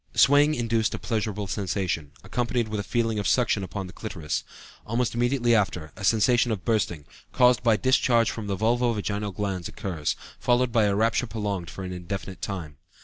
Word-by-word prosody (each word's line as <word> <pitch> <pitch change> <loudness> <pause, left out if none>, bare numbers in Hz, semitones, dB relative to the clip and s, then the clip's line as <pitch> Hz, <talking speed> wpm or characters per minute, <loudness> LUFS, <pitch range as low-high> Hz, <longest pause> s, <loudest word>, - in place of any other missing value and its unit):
Swaying 145 +2 +5
induced 115 -2 0
a - - -4
pleasurable 105 -3 -2
sensation, 95 -6 -2
accompanied 120 -2 -1
with 105 -1 -2
a - - -2
feeling 115 -1 0
of 100 - -1
suction 120 -5 +2
upon 95 +2 -5
the 90 - -10
clitoris. 80 -9 -4 0.4
Almost 115 +1 -1
immediately 120 0 +2
after, 95 -7 0
a 105 - -9
sensation 115 +4 +3
of 105 -3 -3
bursting, 100 -10 0 0.3
caused 125 0 +4
by 115 -3 +3
discharge 125 -2 +3
from 110 -3 -6
the 100 - -1
vulvo 120 +3 +2
vaginal 105 0 -2
glands, 95 -2 -3
occurs, 85 -6 -3 0.2
followed 125 0 +2
by 115 -2 +3
a 100 -1 +2
rapture 115 +3 +1
prolonged 100 -6 -3
for 95 - -7
an 90 0 -5
indefinite 90 +1 -6
time." 85 -8 -5
105 Hz, 180 wpm, -26 LUFS, 95-120 Hz, 0.4 s, Swaying